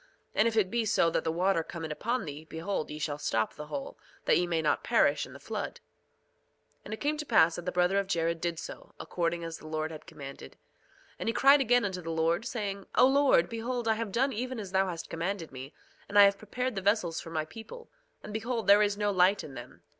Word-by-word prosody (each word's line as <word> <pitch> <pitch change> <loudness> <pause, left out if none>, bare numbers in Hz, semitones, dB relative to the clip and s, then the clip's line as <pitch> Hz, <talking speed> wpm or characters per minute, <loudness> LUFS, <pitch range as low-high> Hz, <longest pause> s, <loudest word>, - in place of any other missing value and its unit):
And 215 - +3
if 225 -1 -1
it 195 -3 +2
be 235 -1 +1
so 200 -6 +2
that - - 0
the 160 - 0
water 180 +1 +2
come 165 0 -7
in 155 - -5
upon 235 +11 -2
thee, 150 0 -7
behold, 165 +1 -3
ye 150 - -6
shall 150 -1 -3
stop 110 -7 0
the 150 0 -8
hole, 275 - -6 0.3
that - - +4
ye 175 - +2
may 170 -2 0
not 150 -2 +1
perish - - +2
in - - -13
the - - -11
flood. - - -4 1.1
2:21 - - -44
And 210 - -6
it - - -19
came 300 +1 0
to 300 - -4
pass 160 0 +5
that 175 - -7
the - - +1
brother 180 +2 +2
of 200 - -2
Jared 165 -2 0
did 170 -1 -1
so, - - -9
according 170 -1 -2
as 165 -1 -6
the 155 - -11
Lord 155 0 -2
had 155 -1 -10
commanded. 135 - -9
2:22 - - -31 0.6
And - - -1
he - - 0
cried 275 +3 +6
again 245 -2 +3
unto 185 -2 -3
the 165 - -7
Lord 165 +5 +1
saying: 200 -4 -4
O - - +7
Lord, 270 -10 +4
behold 235 +1 -3
I 220 - +4
have 220 -2 -4
done 265 +6 +1
even 250 +2 -3
as 200 -4 -6
thou 190 0 +2
hast 170 -2 -5
commanded 170 0 -3
me; 130 +2 -8 0.4
and 205 - 0
I 205 - +10
have 200 0 +4
prepared 250 +4 -3
the 195 - -3
vessels 190 -4 +1
for - - -9
my 160 -1 -2
people, 230 - -11 0.3
and 210 - -8
behold 225 +1 -2
there 200 +1 +7
is 205 -1 +1
no 205 0 +1
light 190 +1 +3
in 140 - -9
them. - - -11
190 Hz, 250 wpm, -30 LUFS, 165-225 Hz, 1.1 s, I